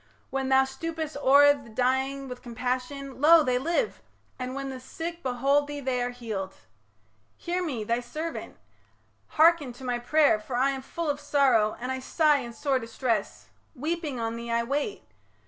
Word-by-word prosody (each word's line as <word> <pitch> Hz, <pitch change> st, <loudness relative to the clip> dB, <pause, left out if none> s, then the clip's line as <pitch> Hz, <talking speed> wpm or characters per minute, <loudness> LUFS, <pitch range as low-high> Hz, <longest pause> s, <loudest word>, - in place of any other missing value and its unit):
When 270 Hz, 0 st, -1 dB
thou 265 Hz, 0 st, +6 dB
stoopest 315 Hz, +3 st, -5 dB
o'er 285 Hz, +1 st, +6 dB
The 275 Hz, -5 st, -11 dB
dying 265 Hz, +4 st, 0 dB
with 250 Hz, -1 st, -8 dB
compassion, 255 Hz, +3 st, -4 dB
lo! 325 Hz, +1 st, +7 dB
they 250 Hz, -2 st, +1 dB
live; 340 Hz, -, -1 dB, 0.4 s
And 255 Hz, +1 st, -4 dB
when 275 Hz, 0 st, -4 dB
the 260 Hz, -, -7 dB
sick 335 Hz, +6 st, -6 dB
behold 275 Hz, +3 st, +1 dB
thee 290 Hz, 0 st, -5 dB
they 260 Hz, -2 st, -1 dB
are 245 Hz, -, 0 dB
healed. 220 Hz, -6 st, -5 dB, 0.8 s
Hear 360 Hz, +1 st, -2 dB
me, 260 Hz, -10 st, -3 dB
thy 235 Hz, +3 st, 0 dB
servant! 305 Hz, +7 st, -6 dB, 0.8 s
hearken 315 Hz, -5 st, +5 dB
to 245 Hz, -, -13 dB
my 245 Hz, -1 st, -1 dB
pray'r, 285 Hz, -2 st, +3 dB
For 245 Hz, +3 st, -5 dB
I 265 Hz, +3 st, +3 dB
am 270 Hz, -1 st, -4 dB
full 330 Hz, +5 st, -5 dB
of 290 Hz, -1 st, -1 dB
sorrow 250 Hz, -9 st, +2 dB
and 250 Hz, +2 st, -3 dB
I 260 Hz, -, -2 dB
sigh 300 Hz, +3 st, +3 dB
In 240 Hz, -3 st, -6 dB
sore 270 Hz, +2 st, 0 dB
distress; 230 Hz, -2 st, -3 dB, 0.3 s
weeping, 305 Hz, -1 st, -3 dB
on 225 Hz, 0 st, -2 dB
thee 235 Hz, 0 st, -6 dB
I 235 Hz, 0 st, +1 dB
wait. 290 Hz, -, -2 dB
265 Hz, 175 wpm, -27 LUFS, 245-290 Hz, 0.8 s, lo